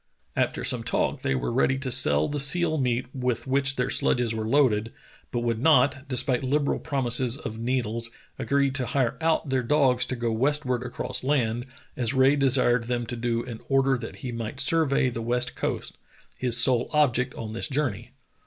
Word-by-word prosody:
After - - -1
some - - +1
talk - - -1
they 65 - 0
were 65 - -2
ready 130 +1 +2
to 130 -1 -3
sell 75 -8 +4
the 145 - -3
seal 155 +3 +1
meat 125 -1 0
with 125 -3 -2
which 135 0 +1
their 125 +1 -1
sledges 120 -3 +1
were 110 -1 -3
loaded, 115 -4 +2 0.4
but 120 - -2
would 115 -2 -1
not, 140 -2 +3
despite 125 -1 0
liberal 140 +2 0
promises 130 -3 0
of 110 -7 -7
needles, 115 -1 -1 0.3
agree 140 -1 +1
to 130 -2 -2
hire 130 -3 0
out 160 -2 +1
their 130 -1 +1
dogs 125 -1 +2
to 130 - -3
go 120 -1 -2
westward 130 +1 0
across 125 0 -4
land, 120 -3 0 0.3
as 125 +1 -1
Rae 130 +2 +4
desired 125 -4 +2
them 120 0 -2
to 120 - -5
do 115 0 -1
in 115 -3 -8
order 135 0 +3
that 125 - -7
he 125 - -3
might 115 +2 -5
survey 140 -3 +2
the 115 - -5
west 125 +2 0
coast - - -4 0.2
— - - -31
his 125 -2 +2
sole 120 0 +3
object 125 -4 +1
on 110 -1 -6
this 115 - -2
journey. 125 -6 -2
125 Hz, 190 wpm, -25 LUFS, 120-135 Hz, 0.4 s, sell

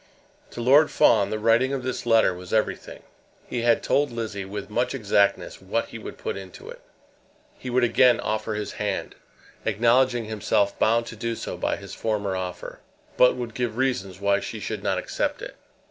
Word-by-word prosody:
To 120 - -7
Lord 140 +6 +5
Fawn 105 -4 +4
the 110 - -2
writing 115 +5 +3
of 135 -2 -3
this 130 -1 -4
letter 115 -5 +4
was 90 0 -10
everything. 110 -1 -2 0.4
He 120 - -3
had 120 0 +3
told 145 +1 +2
Lizzie, 110 -4 -4
with 100 +1 -6
much 120 +5 -1
exactness, 100 -4 +1
what - - -2
he - - -8
would - - -9
put - - -4
into 95 -2 -10
it. - - -12 0.8
He 130 - -6
would 125 0 +2
again 125 +1 +4
offer 110 +1 -2
his 105 -1 -4
hand, 105 -2 -3 0.5
acknowledging 120 +2 +2
himself 105 -2 0
bound 115 +1 +3
to 115 - -8
do 115 +1 -3
so - - -5
by - - -1
his 100 -1 -10
former 105 -3 -2
offer, 90 -1 -6 0.4
but 125 - +5
would 120 -2 -5
give 120 -2 -3
reasons 100 -9 -1
why 100 0 +2
she - - -6
should - - -4
not - - 0
accept - - -2
it. - - -8
110 Hz, 185 wpm, -25 LUFS, 100-120 Hz, 0.8 s, Lord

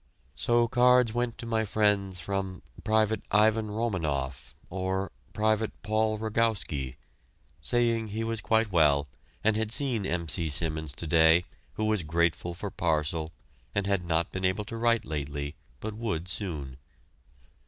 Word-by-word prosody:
So 120 0 +2
cards 125 -1 +4
went 120 -1 -1
to 120 - -7
my 115 -1 +1
friends 100 -3 +1
from 95 +1 -3 0.2
"Pte. 110 -1 +2
Ivan 110 +1 +3
Romanoff" 75 - -2 0.2
or 95 +1 -2 0.2
"Pte. 110 0 +1
Paul 110 +1 +1
Rogowski," 105 - -1 0.7
saying 115 -2 +1
he 110 +2 -3
was 115 -1 -2
quite 110 -2 +2
well 75 -4 +4 0.4
and 110 0 +3
had 110 0 -1
seen 115 -6 +2
M. 85 -1 -2
C. 80 +1 0
Simmons 80 0 0
to 85 - -5
day, 80 +2 +5 0.3
who 110 - -2
was 110 -3 +1
grateful 85 +2 0
for 100 +3 -5
parcel 80 -1 -1 0.4
and 100 -1 +1
had 100 -2 +1
not 85 -1 0
been 95 - -4
able 95 +3 +1
to 115 - -6
write 115 -1 +2
lately, 75 -1 -4 0.3
but 110 0 -5
would 105 -7 -3
soon. 80 -9 -2
100 Hz, 145 wpm, -28 LUFS, 80-110 Hz, 0.7 s, day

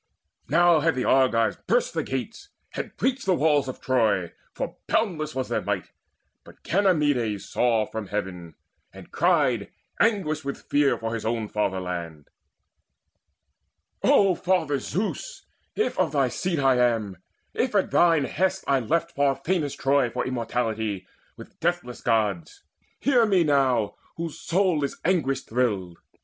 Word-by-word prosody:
Now 170 +2 +5
had 160 -1 +1
the 125 - -1
Argives 125 -4 +3
burst - - +1
the - - 0
gates, 225 - -5 0.2
had - - -6
breached 260 -4 -1
The 185 - +4
walls 150 -3 +2
of 130 - -6
Troy, 110 -9 +1 0.2
for - - -5
boundless 155 -9 0
was 130 -1 -2
their - - -1
might; - - -3 0.5
But - - -17
Ganymedes 145 - +1
saw 115 -3 +1
from 110 -1 -6
heaven, 90 -5 -5 0.4
and - - -13
cried, - - +1 0.3
Anguished 180 -9 +1
with 140 - -4
fear 145 -1 +2
for 115 0 -4
his 115 - -4
own 110 -1 -1
fatherland: 90 -6 -3 1.7
"O 195 -2 +4
Father 175 -6 0
Zeus, 220 - -4 0.3
if 430 - -1
of 165 -5 +1
thy 135 -3 +2
seed 175 +7 -2
I 135 -2 +3
am, 115 -6 +1 0.4
If - - -1
at - - +2
thine 165 -4 +4
best 190 +7 -1
I 140 -1 +2
left 165 +7 -1
far 140 -2 +1
famous 150 0 -1
Troy 135 -2 +2
For 125 +2 -3
immortality 115 -5 -2 0.3
with - - -13
deathless 175 -7 -2
Gods, 105 -7 -1
O - - -45 0.2
hear 245 -5 +4
me 190 -4 +3
now, 130 -8 +1 0.2
whose 165 -2 -5
soul 180 -4 +1
is 140 - -3
anguish 140 -7 +1
thrilled! 105 -8 -1
135 Hz, 145 wpm, -25 LUFS, 115-170 Hz, 1.7 s, Now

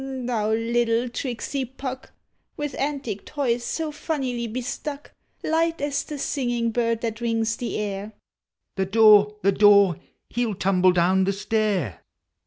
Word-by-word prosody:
Thou 245 -5 -2
little 230 +1 +1
tricksy 255 +2 -3
Puck! 260 +1 -7 0.5
With 295 -1 -3
antic 275 -8 -3
toys 245 -5 -1
so 315 +4 -3
funnily 260 -6 -3
besluck, 265 +5 -5 0.3
Light 330 +1 +1
as 285 0 -1
the 300 - -7
singing 240 -4 -1
bird 230 -1 0
that 225 -1 -3
rings 225 -1 0
the 240 - -4
air. 205 0 -4 0.6
(The 190 -1 0
door! 210 0 +6
the 195 - +4
door! 200 -4 +5 0.3
he 240 - -3
11 220 -6 -1
tumble 185 -1 +4
down 185 +2 +3
the 195 - +1
stair!) 205 - -1
230 Hz, 140 wpm, -24 LUFS, 205-265 Hz, 0.6 s, door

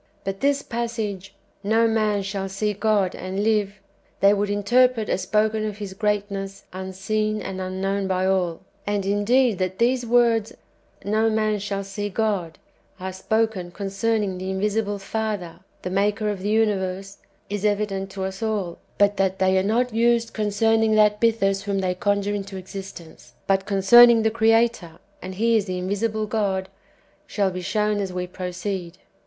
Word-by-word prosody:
But 195 0 -4
this 280 0 +1
passage, 220 -5 -4
" - - -39
No 230 +1 +4
man 215 -2 +1
shall 195 0 -4
see 210 +2 -1
God 205 -2 +1
and 190 +2 -3
live," 210 -2 +1 0.4
they 200 +1 +6
would 205 0 0
interpret 225 +3 +2
as - - 0
spoken 215 +1 +1
of 210 -1 -4
His 205 -3 -6
greatness 200 -1 -2
un 190 0 -5
seen 215 +3 -1
and 190 -2 -5
unknown 195 +1 -2
by 185 0 0
all; 185 -3 0 0.3
and 205 -1 -1
indeed 205 +2 +2
that 185 0 -2
these 245 +2 +2
words, 230 -2 +2 0.3
" - - -27
No 220 +1 +3
man 215 -1 0
shall 200 0 -3
see 205 +1 -4
God," 200 -6 -1 0.4
are 190 0 -5
spoken 220 -1 -1
concerning 195 +1 -1
the 185 +1 -4
invisible 205 +2 -1
Father, 200 -3 -4 0.2
the 180 - -4
Maker 205 +2 +1
of 200 - -5
the 205 - -2
universe, 195 -3 0 0.3
is 205 0 -4
evident 205 -2 0
to 190 0 -5
us 190 +1 -5
all; 210 -6 -2 0.2
but 205 0 +3
that 190 -1 +1
they 190 0 +2
are - - +2
not 230 +5 0
used 235 0 +2
concerning 220 +1 +2
that 210 -1 +4
Bythus 195 -4 +2
whom 200 -1 -1
they 185 -1 0
conjure 200 +2 0
into 195 -1 -5
existence, 180 -9 -10
but 195 -1 +1
concerning 225 +4 +7
the 220 - +2
Creator 225 -5 +2 0.3
(and 185 0 -7
He 230 +3 +3
is 205 - 0
the 185 -2 -3
invisible 210 +4 -1
God), 195 -3 -1 0.6
shall 200 -3 0
be 185 0 -5
shown 210 +2 0
as 195 -2 -2
we 180 0 -3
proceed. 180 0 -5
205 Hz, 170 wpm, -23 LUFS, 190-220 Hz, 0.6 s, concerning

